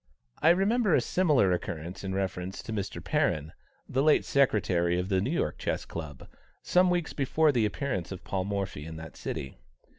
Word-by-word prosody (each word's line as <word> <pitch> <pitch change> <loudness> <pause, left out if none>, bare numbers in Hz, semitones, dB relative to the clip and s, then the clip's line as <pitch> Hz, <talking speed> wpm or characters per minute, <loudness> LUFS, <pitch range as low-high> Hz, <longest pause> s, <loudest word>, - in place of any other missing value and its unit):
I 160 - +6
remember 195 +2 +3
a - - +5
similar 145 - +3
occurrence 90 +1 -4
in 95 -1 -3
reference 95 -1 -3
to 115 - -5
Mr. 100 -2 -4
Perrin, 75 +1 0 0.4
the 130 - 0
late 150 +1 +4
secretary 90 -10 +2
of 90 +2 -2
the 95 -2 +2
New 110 - -1
York 170 - -1
Chess - - -2
Club, 75 -4 -7 0.4
some 180 0 +4
weeks 175 -2 0
before 150 +2 +2
the 115 -5 +2
appearance 105 - -3
of 95 - -7
Paul 95 -1 -2
Morphy 100 -6 -3
in 80 +1 -7
that 80 0 -9
city. 65 -2 -5
100 Hz, 180 wpm, -29 LUFS, 90-145 Hz, 0.4 s, I